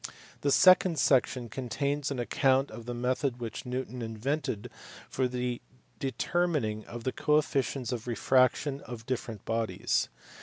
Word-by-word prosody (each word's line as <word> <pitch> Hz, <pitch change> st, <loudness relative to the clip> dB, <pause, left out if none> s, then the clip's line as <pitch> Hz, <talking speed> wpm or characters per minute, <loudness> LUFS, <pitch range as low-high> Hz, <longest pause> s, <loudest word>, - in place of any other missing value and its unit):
The 140 Hz, -, +1 dB
second 185 Hz, 0 st, +6 dB
section 125 Hz, -3 st, +2 dB
contains 140 Hz, +5 st, -2 dB
an 140 Hz, -, -3 dB
account 135 Hz, +2 st, +2 dB
of 115 Hz, +1 st, -9 dB
the 120 Hz, -, -2 dB
method 125 Hz, +1 st, -1 dB
which 115 Hz, +1 st, -5 dB
Newton 125 Hz, 0 st, -4 dB
invented 115 Hz, +1 st, -3 dB, 0.4 s
for 130 Hz, -1 st, 0 dB
the 125 Hz, -1 st, -3 dB, 0.4 s
deter 140 Hz, +7 st, 0 dB
mining 110 Hz, -10 st, -1 dB, 0.2 s
the 130 Hz, -, 0 dB
coefficients 145 Hz, -4 st, +1 dB
of 120 Hz, -1 st, -4 dB
refraction 130 Hz, +4 st, +2 dB
of 115 Hz, -2 st, -7 dB
different 120 Hz, -4 st, -4 dB
bodies. 115 Hz, 0 st, 0 dB
125 Hz, 130 wpm, -30 LUFS, 120-140 Hz, 0.4 s, second